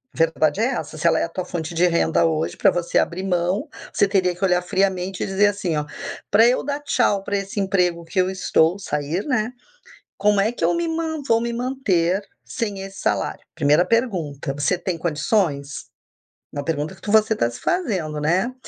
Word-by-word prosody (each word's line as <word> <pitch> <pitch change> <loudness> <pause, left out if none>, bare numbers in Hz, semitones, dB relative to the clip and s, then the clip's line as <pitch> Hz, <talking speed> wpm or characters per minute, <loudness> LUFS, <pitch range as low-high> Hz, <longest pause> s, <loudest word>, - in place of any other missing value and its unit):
A - - -14
verdade 165 +3 +2
é - - +3
essa, 190 - -5
se 160 - -5
ela 160 -1 +3
é - - +1
a - - -8
tua 180 +2 -4
fonte 170 -1 -4
de 175 +2 +4
renda 170 -1 +2
hoje, 160 -1 -1
pra 195 - +4
você 175 -1 -1
abrir 175 +2 -1
mão, 185 - 0 0.3
você 205 - +3
teria 185 -2 +2
que 180 - -7
olhar 180 -2 +3
friamente 190 0 -1
e - - -2
dizer, 195 +2 +3
assim, 195 -5 -1
ó: 150 - -1 0.5
"Pra 220 +3 +6
eu 250 - +2
dar 285 +1 -2
tchau 205 -8 +1
pra 200 - -1
esse 195 +1 -4
emprego 180 -3 +1
que 165 +3 -2
eu 185 0 +3
estou, 180 -1 +2
sair, 150 +1 -2
né, 245 -4 0 0.7
como 205 0 +3
é 215 +3 +1
que 240 - -2
eu - - +3
me 340 0 0
man 320 -1 -2
vou 230 - +4
me 235 0 -2
manter 210 -8 0 0.2
sem 205 -5 -4
esse 195 0 -8
salário?". - - -1
Primeira 150 +5 +3
pergunta, 175 - -1
você 145 +6 0
tem 180 -1 -3
condições? 150 -3 -1 0.7
Uma 145 0 -4
pergunta 155 +2 -2
que 205 - -7
você 220 +1 +4
está 120 - +1
se 120 - -9
fazendo, 190 - -1
né. 185 +11 +1
185 Hz, 200 wpm, -22 LUFS, 165-210 Hz, 0.7 s, Pra